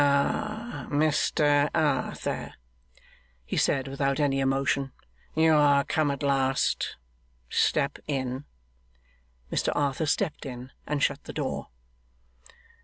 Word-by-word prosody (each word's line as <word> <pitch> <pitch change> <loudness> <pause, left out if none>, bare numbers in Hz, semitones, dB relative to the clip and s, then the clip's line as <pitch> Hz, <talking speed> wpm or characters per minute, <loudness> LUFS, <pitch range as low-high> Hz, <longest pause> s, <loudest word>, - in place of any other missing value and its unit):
'Ah, 215 +11 0
Mr 145 -1 +3
Arthur?' 155 -4 -1 0.9
he - - -4
said, 135 -1 +1
without 135 +1 -1
any 140 -2 +2
emotion, 135 0 +1 0.4
'you 160 0 +5
are 145 -2 +5
come 155 0 +1
at 140 0 -3
last? 135 -1 +1 0.5
Step 140 -2 +1
in.' 130 -1 -2 1.1
Mr - - +1
Arthur 145 +1 0
stepped 145 +1 0
in 130 -2 -7 0.2
and 150 -1 0
shut 145 0 0
the - - -7
door. - - -3
140 Hz, 110 wpm, -27 LUFS, 135-150 Hz, 1.1 s, you